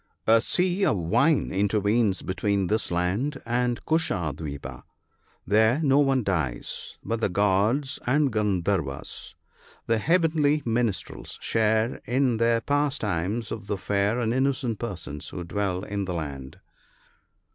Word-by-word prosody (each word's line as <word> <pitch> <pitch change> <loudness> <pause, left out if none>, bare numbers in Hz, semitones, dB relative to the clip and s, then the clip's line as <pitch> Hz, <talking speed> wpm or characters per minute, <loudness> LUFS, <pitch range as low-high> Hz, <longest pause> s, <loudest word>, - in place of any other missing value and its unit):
A 115 +1 +5
sea 180 - 0
of 150 - +2
wine 135 - +2
intervenes 105 +1 +1
between 100 +1 0
this 110 +4 0
land 95 +12 -1
and 120 0 -1
Kusha 95 - 0
dwipa. 70 -4 -7 0.6
There 110 - +3
no 140 -1 +4
one 135 -3 +3
dies; 75 -12 -3
but 115 0 -2
the - - +2
gods 105 +8 +1
and 140 +2 +3
gandharvas, 95 -9 -1 0.5
the 115 -1 +1
heavenly 155 -1 +2
minstrels, 115 -3 -2
share 110 +1 +1
in 125 -1 +1
the 115 0 +2
pastimes 115 - -1
of 110 -2 -6
the 100 -1 -1
fair 100 +4 0
and 115 -1 0
innocent 130 -4 0
persons 85 -10 -5
who 90 - -6
dwell 95 0 -2
in 100 -1 -3
the 90 -1 -3
land. 70 -5 -6
110 Hz, 130 wpm, -26 LUFS, 95-130 Hz, 0.6 s, A